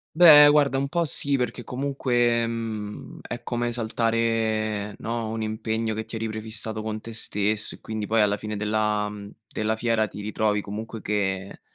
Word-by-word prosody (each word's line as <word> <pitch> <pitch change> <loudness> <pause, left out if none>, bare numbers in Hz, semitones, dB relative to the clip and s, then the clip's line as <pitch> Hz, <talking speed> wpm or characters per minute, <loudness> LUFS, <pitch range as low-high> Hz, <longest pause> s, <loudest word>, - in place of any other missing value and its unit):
Beh, 150 -4 +10
guarda, 145 -2 +3
un 135 +1 0
po' 170 +2 0
sì 140 -1 +1
perché 125 -1 -2
comunque, 125 -3 +1
mhmm, 110 -3 -5
è 120 - -6
come 120 0 -1
saltare, 110 -2 0
no, 115 0 -3
un 115 - -3
impegno 110 0 -2
che 110 +1 -4
ti 115 - -7
eri 115 - -2
prefissato 110 0 -4
con 110 0 -4
te 115 +1 -9
stesso 105 0 -1
e - - -28
quindi 110 -1 -5
poi 115 +1 +3
alla 105 -1 +3
fine 105 0 -5
della 105 0 0
mhmm, 105 -1 -8 0.2
della 110 +1 -1
fiera 110 -1 +1
ti 105 - -9
ritrovi 105 0 0
comunque 110 +2 -6
che 95 -2 -2
110 Hz, 175 wpm, -25 LUFS, 105-120 Hz, 0.2 s, Beh